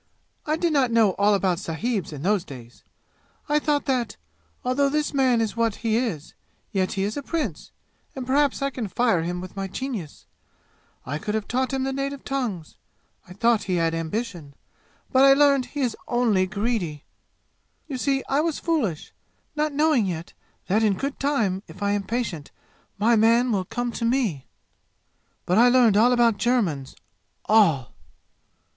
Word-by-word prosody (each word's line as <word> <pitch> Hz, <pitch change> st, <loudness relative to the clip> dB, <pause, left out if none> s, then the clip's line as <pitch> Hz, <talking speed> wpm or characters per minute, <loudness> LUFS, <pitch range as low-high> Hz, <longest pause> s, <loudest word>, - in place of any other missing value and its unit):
"I 305 Hz, -, +2 dB
did 335 Hz, -1 st, 0 dB
not 270 Hz, -4 st, +3 dB
know 225 Hz, -4 st, +4 dB
all 205 Hz, +1 st, +4 dB
about 185 Hz, -3 st, 0 dB
sahibs 195 Hz, +2 st, -3 dB
in 145 Hz, -2 st, -7 dB
those 200 Hz, -1 st, +1 dB
days. 125 Hz, -8 st, -12 dB, 0.6 s
I 295 Hz, 0 st, +2 dB
thought 295 Hz, -1 st, 0 dB
that, 250 Hz, -6 st, -1 dB, 0.5 s
although 275 Hz, +3 st, +2 dB
this 300 Hz, +1 st, -1 dB
man 260 Hz, -4 st, +3 dB
is 225 Hz, -1 st, -1 dB
what 230 Hz, -2 st, +1 dB
he 220 Hz, -1 st, +2 dB
is, 200 Hz, -, -2 dB, 0.4 s
yet 190 Hz, -3 st, 0 dB
he 195 Hz, -, -1 dB
is 210 Hz, +5 st, -2 dB
a -, -, -2 dB
prince, 275 Hz, -, -4 dB, 0.4 s
and 260 Hz, -2 st, -5 dB
perhaps 275 Hz, +1 st, +1 dB
I 275 Hz, -, 0 dB
can 245 Hz, -5 st, -4 dB
fire 225 Hz, -3 st, +1 dB
him 175 Hz, +2 st, -3 dB
with 185 Hz, +1 st, -9 dB
my 195 Hz, -1 st, -3 dB
genius. 210 Hz, -, -6 dB, 0.8 s
I 145 Hz, +4 st, -3 dB
could 210 Hz, +6 st, -3 dB
have 215 Hz, -1 st, -2 dB
taught 260 Hz, +2 st, -1 dB
him 265 Hz, -1 st, -1 dB
the 270 Hz, 0 st, -2 dB
native 275 Hz, 0 st, -4 dB
tongues. 235 Hz, -, -4 dB, 0.5 s
I 180 Hz, -, -11 dB
thought 230 Hz, +3 st, +2 dB
he 185 Hz, -, 0 dB
had 165 Hz, -1 st, +1 dB
ambition, 165 Hz, -3 st, -4 dB, 0.6 s
but 260 Hz, 0 st, +5 dB
I 275 Hz, 0 st, +8 dB
learned 280 Hz, -2 st, +4 dB
that 250 Hz, -, -18 dB
he 290 Hz, -, -3 dB
is 245 Hz, -4 st, 0 dB
only 225 Hz, -6 st, +2 dB
greedy. 200 Hz, -, -2 dB, 0.8 s
You 275 Hz, -5 st, -5 dB
see, 270 Hz, 0 st, 0 dB
I 275 Hz, +2 st, +2 dB
was 325 Hz, -1 st, -1 dB
foolish, 255 Hz, -, -2 dB, 0.4 s
not 305 Hz, 0 st, 0 dB
knowing 290 Hz, -7 st, +2 dB
yet 170 Hz, -2 st, -5 dB, 0.3 s
that 210 Hz, +4 st, +1 dB
in 210 Hz, -3 st, +3 dB
good 275 Hz, +1 st, -4 dB
time 225 Hz, -10 st, 0 dB
if -, -, -9 dB
I 200 Hz, -, +1 dB
am 205 Hz, 0 st, 0 dB
patient 205 Hz, -9 st, -3 dB, 0.5 s
my 230 Hz, +3 st, +3 dB
man 230 Hz, +3 st, +4 dB
will 190 Hz, -4 st, 0 dB
come 245 Hz, +5 st, -3 dB
to 230 Hz, -, -3 dB
me! 230 Hz, -, 0 dB, 1.0 s
But 180 Hz, +4 st, +2 dB
I 245 Hz, +1 st, +7 dB
learned 245 Hz, -4 st, +5 dB
all 230 Hz, +4 st, +5 dB
about 235 Hz, -3 st, +3 dB
Germans 190 Hz, -, 0 dB, 0.5 s
all! 180 Hz, -, +3 dB
230 Hz, 175 wpm, -24 LUFS, 190-265 Hz, 1.0 s, I